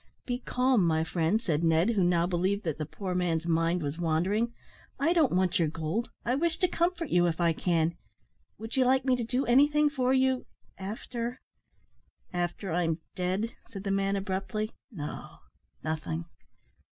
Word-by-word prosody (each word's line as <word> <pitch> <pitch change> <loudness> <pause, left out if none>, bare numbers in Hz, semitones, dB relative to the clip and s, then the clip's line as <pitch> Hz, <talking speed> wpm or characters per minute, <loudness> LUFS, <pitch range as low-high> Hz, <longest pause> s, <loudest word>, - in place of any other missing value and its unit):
"Be 245 -1 -2
calm, 250 -4 +2
my 160 -2 +2
friend," 165 +5 +1
said 165 -8 -1
Ned, 165 +6 +4
who 200 -5 +2
now 175 -1 +3
believed 185 +4 0
that 160 -4 -2
the 155 - -3
poor 185 +2 -4
man's 170 -2 0
mind 165 +1 +1
was 145 +3 -3
wandering, 185 +8 +1 0.5
"I 320 +5 +3
don't 320 -7 +4
want 185 0 +2
your 165 - +3
gold; 165 +9 -2 0.2
I 240 - +1
wish 325 +4 +1
to 365 - +2
comfort 340 -2 0
you, 175 0 +4
if 165 0 -1
I 170 -1 +3
can. 165 -1 +1 0.6
Would 225 +1 -6
you 260 - +4
like 260 +1 +3
me 260 -1 +4
to 245 - -2
do 250 +4 0
anything 295 +4 +4
for 255 -3 +1
you 260 -1 +2 0.3
after 235 +5 -5 0.5
" - - -39
"After 180 +2 -7
I'm 165 -2 +1 0.2
dead," 190 +5 -1 0.2
said 195 -3 -7
the 200 - -1
man, 195 0 +1
abruptly. 195 +2 -2 0.2
"No, 150 -9 -7 0.5
nothing. 160 +1 -3
195 Hz, 175 wpm, -29 LUFS, 170-245 Hz, 0.6 s, Ned